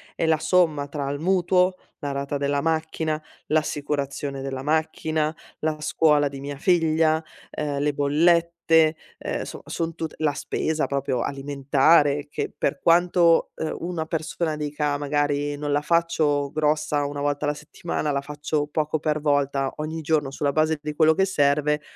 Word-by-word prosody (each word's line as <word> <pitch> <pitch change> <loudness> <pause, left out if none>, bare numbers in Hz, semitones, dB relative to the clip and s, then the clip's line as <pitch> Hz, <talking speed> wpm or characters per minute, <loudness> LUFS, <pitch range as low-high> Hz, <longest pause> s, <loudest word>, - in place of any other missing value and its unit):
è - - 0
la 160 -1 +3
somma 155 -3 +2
tra 140 -1 -4
il 145 0 -3
mutuo, 180 +1 +2 0.2
la 145 - -3
rata 140 +1 -2
della 140 0 0
macchina, 160 -1 -1 0.3
l'assicurazione 145 -2 -2
della 135 -1 -4
macchina, 155 0 0 0.2
la 155 0 -1
scuola 150 -1 +3
di 140 0 -8
mia 140 +1 -6
figlia, 160 -1 +2 0.3
ehm, 145 -2 -3
le 145 +1 +1
bollette, 165 +2 +3 0.2
ehm, - - -3
soma - - -9
son 165 0 -3
tute 160 -2 -5
la 155 -2 +1
spesa 155 +2 -1
proprio 135 -3 -1
alimentare, 140 +2 +2
che - - -3
per 140 - -1
quanto, 170 0 +4
ehm, 160 - -3
una 170 -2 -3
persona 160 0 -2
dica, 150 -1 -1
magari: 145 0 0
"Non 145 0 -3
la 145 0 +2
faccio 150 -3 +1
grossa 150 -1 +1
1 145 0 -4
volta 145 0 -1
alla 145 - +1
settimana, 150 0 -4
la 140 -1 0
faccio 150 +1 -2
poco 155 +1 -1
per 155 0 0
volta 140 -2 +1
ogni 155 +1 -4
giorno 150 -2 +1
sulla 140 +1 -1
base 155 +2 +1
di 150 0 -4
quello 155 +1 +4
che 190 - +3
serve," 150 -3 +2
150 Hz, 160 wpm, -24 LUFS, 145-160 Hz, 0.3 s, quanto